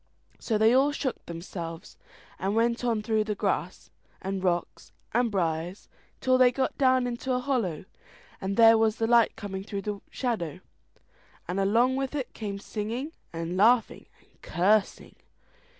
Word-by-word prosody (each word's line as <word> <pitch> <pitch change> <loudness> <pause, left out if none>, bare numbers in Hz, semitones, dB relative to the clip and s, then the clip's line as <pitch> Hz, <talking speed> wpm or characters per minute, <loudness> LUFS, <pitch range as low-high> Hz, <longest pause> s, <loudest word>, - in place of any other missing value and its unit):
So 220 - 0
they 220 +2 +5
all 270 +3 +4
shook 280 -3 -3
themselves, 170 0 -7 0.4
and 195 +3 -1
went 235 +1 +1
on 230 -3 0
through 220 -1 +1
grass, - - -2 0.3
and 190 0 -4
rocks, 175 -2 -2 0.2
and 240 +1 +2
briars, 175 -1 -2 0.3
till 255 0 +3
they 250 -1 +6
got 260 +1 -1
down 260 -2 +3
into 245 +2 -3
a 250 - +1
hollow, 240 - -1 0.6
and 195 +1 -3
there 225 -1 +7
was 220 -1 +2
the 225 - -1
light 235 0 +4
coming 195 -2 -6
through 200 -1 -5
the 205 -1 -4
shadow, 215 - -3 0.9
and 180 +3 -2
along 235 +7 +3
with 270 +1 -2
it 270 -4 -4
came 205 -3 -5
singing, 225 +8 -4 0.2
and 165 +1 -4
laughing, 225 +3 +3
and - - -31
cursing. 200 +4 +1
220 Hz, 150 wpm, -27 LUFS, 190-245 Hz, 0.9 s, there